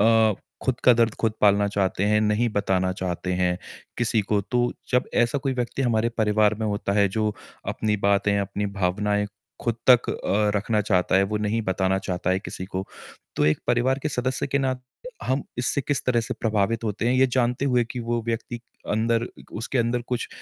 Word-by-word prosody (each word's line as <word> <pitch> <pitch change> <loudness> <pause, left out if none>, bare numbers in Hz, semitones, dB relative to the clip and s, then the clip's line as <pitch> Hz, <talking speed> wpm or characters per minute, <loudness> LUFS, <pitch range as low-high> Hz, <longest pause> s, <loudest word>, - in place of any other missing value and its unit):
अ, 110 -1 +5 0.3
खुद 130 -2 -1
का 125 - +8
दर्द 115 -2 +2
खुद 115 -1 +2
पालना 100 0 +4
चाहते 100 -1 0
हैं, 105 +1 +3
नहीं 105 +3 +2
बताना 95 -3 +1
चाहते 90 0 -3
हैं 90 -1 +1 0.4
किसी 115 -2 +2
को, 100 0 +1
तो 120 +4 0 0.2
जब 125 0 +3
ऐसा 120 +4 +2
कोई 135 -1 -1
व्यक्ति 125 +2 -2
हमारे 115 -2 +2
परिवार 105 -1 +3
में 110 - 0
होता 100 -1 -1
है 100 -1 +4
जो 105 +2 0 0.4
अपनी 105 -1 0
बातें, 100 0 +2
अपनी 100 +1 -2
भावनाएँ 100 +1 0 0.3
खुद 120 - 0 0.2
तक 125 -1 +6
अ, 105 +1 0
रखना 105 +1 +1
चाहता 95 -3 +2
है, 95 - +5
वो 100 +2 -1
नहीं 105 +2 0
बताना 95 0 +1
चाहता 90 -1 -2
है 95 - +2
किसी 95 - -6
को, 95 +1 -4 0.5
तो - - +2
एक 75 - +3
परिवार 125 +3 +2
के 150 - 0
सदस्य 130 -1 -1
के 140 0 0
नात 130 -2 -1 0.4
हम 130 +1 0 0.2
इससे 125 +3 0
किस 140 +1 -2
तरह 120 -2 +3
से 125 +2 -4
प्रभावित 110 +1 0
होते 110 +2 -2
हैं, 125 - +2
ये 130 +1 +5
जानते 125 +1 0
हुए 125 -3 +2
कि 125 - -4
वो 120 0 -1
व्यक्ति 115 +1 -3 0.3
अंदर 115 +2 +1 0.3
उसके 120 +4 -2
अंदर 120 +1 +1
कुछ 125 -2 -2
110 Hz, 195 wpm, -24 LUFS, 100-120 Hz, 0.5 s, का